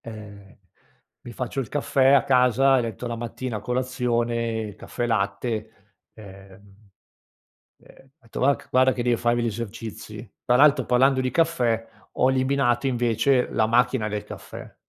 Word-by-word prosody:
Eh, 100 -3 -11 0.7
mi 120 - -9
faccio 125 +2 -4
il 125 - -4
caffè 135 -2 +2
a 140 - +5
casa 130 +1 +3
e - - +1
letto 115 0 -5
la 120 -1 -3
mattina 120 0 -5
a - - -6
colazione, 120 -2 -2
caffè 120 - -5
latte, 105 -1 -3 0.2
ehm, 100 0 -16 0.9
ehm, - - -20
ho - - -26
detto: 115 - -8
“Va 140 +2 +3
c - - -18
guarda 130 0 +4
che 120 - -3
devo 120 -1 +1
farmi 120 0 +1
gli - - 0
esercizi”. 110 0 -7 0.2
Tra 125 -1 +4
l'altro, 140 -1 +4
parlando 130 +2 +3
di 130 0 -1
caffè, 125 -9 0 0.3
ho 130 - +2
eliminato, 130 -1 +1
invece, 125 +1 +1
la 110 - +1
macchina 120 -1 +1
del 105 -1 -4
caffè. - - -11
120 Hz, 155 wpm, -24 LUFS, 110-130 Hz, 0.9 s, a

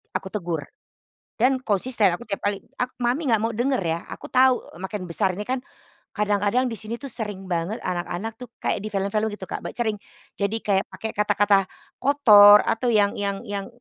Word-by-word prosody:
Aku - - -2
tegur, 170 -7 -3 0.7
dan 255 +3 +3
konsisten 215 -1 +2
aku 210 - -10
tiap 200 -2 -4
kali, 205 -1 -2 0.2
ak 250 0 -2
"Mami 260 +6 0
nggak 225 -3 +3
mau 225 - 0
denger 250 +3 0
ya". 165 0 -1
Aku - - -9
tahu 260 0 +4 0.2
makin 190 0 -4
besar 185 +2 0
ini 205 - -4
kan, 260 +2 -1 0.6
kadang-kadang 210 +4 +1
di - - -3
sini 220 +2 -5
tuh 275 +1 -6
sering 205 -5 -5
banget 175 +6 -1
anak-anak 180 +4 -3
tuh 250 - -9
kayak - - 0
di 215 - -4
film-film 200 +2 -1
gitu 200 -2 -7
Kak, - - -4
bac - - -5
sering 220 -3 0 0.4
jadi 200 +2 0
kayak 195 -2 +1
pake 225 - -3
kata-kata 205 -1 +3 0.3
kotor, 210 -7 +8
atau 225 +3 0
yang 205 -2 +3
yang 200 -1 -2
yang 200 -1 -4
210 Hz, 185 wpm, -24 LUFS, 195-235 Hz, 0.7 s, kotor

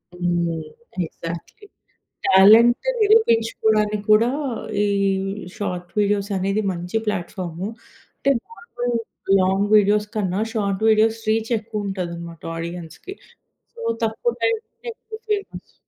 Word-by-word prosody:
హ్మ్. 175 -2 -1 0.4
Exactly. 170 - -8 0.6
Talent 220 - +6
నిరూపించుకోవడానికి 225 - +3
కూడా 225 +3 +5 0.5
ఈ - - +2 0.7
షార్ట్ 180 -3 -4
వీడియోస్ 205 0 +1
అనేది 195 +3 0
మంచి 180 +3 -6
ప్లాట్‌ఫార్మూ. 180 -2 -3 0.5
అంటే 275 - +1 0.2
నార్మల్ 245 - -4 0.4
లాంగ్ 190 +2 +2
వీడియోస్ 210 0 +4
కన్నా 195 -1 0
షార్ట్ 200 -2 -1
వీడియోస్ 220 +1 +3
రీచ్ 225 +2 0
ఎక్కువ 215 -1 -5
ఉంటదన్నమాట 170 -3 -5
ఆడియన్స్‌కి. 170 - -7 0.6
సో 470 - -11 0.2
తక్కువ 225 - 0
టైంలోనే 455 +1 -2
ఎక్కువ 440 -1 -10
ఫేమస్. 410 -1 -3
210 Hz, 100 wpm, -22 LUFS, 180-230 Hz, 0.7 s, Talent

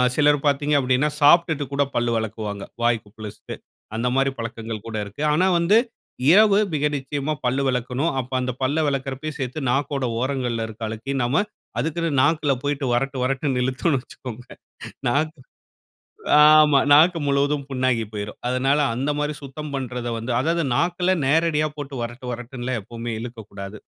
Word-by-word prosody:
சிலர் 145 -1 +3
பார்த்தீங்க 145 +1 +1
அப்படின்னா 130 +3 +2
சாப்பிட்டுட்டு 160 -1 +5
கூட 140 - +3
பல் 120 0 +1
விலக்குவாங்க, 110 -2 -4 0.2
வாய் 120 -1 +2
குப்பளிச்சிட்டு. 105 0 -9 0.4
அந்த 120 +2 -1
மாதிரி 135 0 +2
பழக்கங்கள் 115 -2 -6
கூட 115 - -6
இருக்கு. 100 +9 -9
ஆனா 180 +5 +3
வந்து 190 +6 +4 0.5
இரவு 205 +1 +6 0.2
மிக 150 0 +1
நிச்சயமா 140 +2 -3
பல் 130 +3 +1
விலக்கணும். 125 +5 0
அப்ப 130 0 -5
அந்த 125 - -1
பல்லை 145 +5 +1
விலக்கறப்பையும் 140 +2 -3
சேர்த்து 130 +3 -3
நாக்கோட 140 -1 -1
ஓரங்கள்ல 125 -3 -1
இருக்கிற 110 +1 -7
அழுக்கையும் 120 +5 -3
நாம 140 +11 +2 0.4
அதுக்குன்னு 165 +5 -1
நாக்கில் 145 -2 +2
போயிட்டு 145 -1 -1
வரட்டு 135 +2 -1
வரட்டுன்னு 135 -1 0
இழுத்தோம்னு 130 +3 0
வச்சுக்கோங்க, 125 -1 -10 0.6
நாக்கு 155 +4 0 1.0
ஆமா. 150 -1 +7
நாக்கு 165 +4 +6
முழுவதும் 140 +1 +1
புண்ணாகி 130 -3 +1
போயிறும். 105 0 -6
அதனால் 135 +4 +2
அந்த 135 +5 -1
மாதிரி 150 +1 -1
சுத்தம் 145 +2 -7
பண்றத 125 -2 -4
வந்து 115 +2 -3
அதாவது 165 +3 0
நாக்கில 180 +5 +1
நேரடியா 155 +1 +2
போட்டு 145 -1 -7
வரட்டு 120 +2 -6
வரட்டுன்னுல்லாம் 120 0 -4
எப்போமே 115 +3 -6
இழுக்கக்கூடாது. 105 -4 -8
135 Hz, 145 wpm, -23 LUFS, 120-150 Hz, 1.0 s, ஆமா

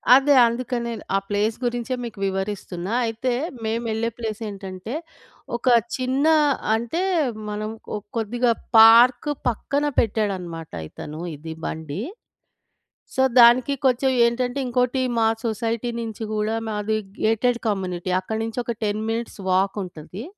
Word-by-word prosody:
అదే. 275 +2 +5
అందుకే 245 +2 -2
నేను, 230 -1 -5
ఆ - - +5
ప్లేస్ 210 +2 +1
గురించే 240 +1 -1
మీకు 220 -4 -8
వివరిస్తున్నా. 190 -1 -3
అయితే 230 +3 -1 0.3
మేమెళ్ళే 225 0 -1
ప్లేసేంటంటే, 210 -1 -5 0.6
ఒక 240 - -5 0.3
చిన్న 260 +3 0 0.5
అంటే 235 +10 -2 0.5
మనం 210 +1 -3 0.3
ఓ - - -1 0.2
కొద్దిగా 235 +2 +1 0.3
పార్క్ 235 +4 +7 0.2
పక్కన 280 +5 -1
పెట్టాడనమాట. 185 -7 -1 0.2
ఇతను 150 +1 -8 0.2
ఇది 160 +2 -7
బండి. 160 +3 -4 1.1
సో, 265 - +2 0.2
దానికి 245 +4 +7
కొంచెం 260 +1 +3
ఏంటంటే, 245 +3 0
ఇంకోటి 250 +1 +1 0.2
మా 225 - +4 0.2
సొసైటీ 230 +1 -1
నించి 225 -1 -5
గూడా 215 +1 0
మాది 215 0 -1 0.3
గేటెడ్ 235 +2 +2
కమ్యూనిటీ. 185 -3 -2
అక్కడి 220 +4 -4
నుంచొక 235 0 -3
10 210 +1 -1
మినిట్స్ 230 -1 -4
వాకుంటది. 190 0 -2
225 Hz, 120 wpm, -23 LUFS, 205-240 Hz, 1.1 s, పార్క్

